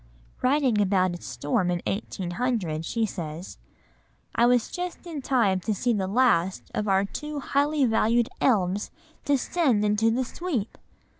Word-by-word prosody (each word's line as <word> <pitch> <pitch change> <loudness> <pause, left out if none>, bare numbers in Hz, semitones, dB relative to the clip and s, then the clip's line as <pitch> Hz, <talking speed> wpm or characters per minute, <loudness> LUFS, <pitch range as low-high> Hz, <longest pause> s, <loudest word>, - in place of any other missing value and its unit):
Writing 255 -5 +2
about 185 -2 +2
a 175 - -8
storm 175 +5 -1
in 175 -1 0
1800, 190 -3 -2
she 225 +6 0
says: 170 -3 -7 0.7
"I 235 - +4
was 245 -1 +2
just 360 0 -5
in 320 -5 -5
time 230 -8 +2
to 210 +3 -2
see 240 +4 +1
the 195 -3 -1
last 195 -5 +1
of 210 - -2
our 195 0 +3
two 300 +7 -5
highly 285 +1 +1
valued 230 0 +2
elms 200 -4 +2 0.4
descend 275 -5 +2
into 210 +2 +2
the 250 +3 0
Sweep!!! 265 - -3
225 Hz, 145 wpm, -26 LUFS, 190-260 Hz, 0.7 s, I